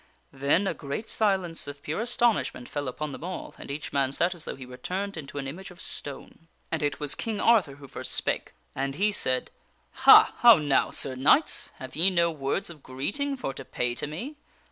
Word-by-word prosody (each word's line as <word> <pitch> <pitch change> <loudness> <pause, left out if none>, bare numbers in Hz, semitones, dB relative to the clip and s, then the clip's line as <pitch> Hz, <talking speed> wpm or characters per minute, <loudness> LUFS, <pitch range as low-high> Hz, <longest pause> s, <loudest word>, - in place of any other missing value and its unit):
' - - -39
Then 140 +8 +2
a 190 - 0
great 145 +9 -5
silence 190 -8 0
of 145 0 -8
pure 155 +8 -2
astonishment 235 - 0
fell 145 -2 -4
upon 150 +4 -4
them 135 - -8
all, 185 +1 -6
and - - -9
each 145 +2 -5
man 135 -1 +2
sat 175 +6 +1
as 170 -3 -8
though - - -5
he 130 - -9
were 125 0 -10
turned 190 +9 -4
into 145 -3 -8
an 135 -1 -3
image 180 +8 -7
of 180 -1 -15
stone. 145 +2 -6 0.2
And 160 - -1
it 145 -1 -1
was 145 -1 -2
King 220 -2 -3
Arthur 200 -12 +4
who 140 0 -12
first - - -6
spake. - - -2 0.2
And 135 0 -2
he 205 +6 +2
said: 130 -10 0 0.2
" - - -40 0.2
Ha! - - +10
how 235 -2 +9
now, 145 -3 +2
Sir 135 - +1
Knights? 140 - +3
Have 130 - -9
ye 170 +5 +5
no 170 -2 +2
words 145 +4 -2
of 155 -4 -13
greeting 205 - -3
for 190 - -4
to 135 - -8
pay 125 -1 -2
to 125 - -4
me? 235 - -6
150 Hz, 220 wpm, -27 LUFS, 140-195 Hz, 0.2 s, Ha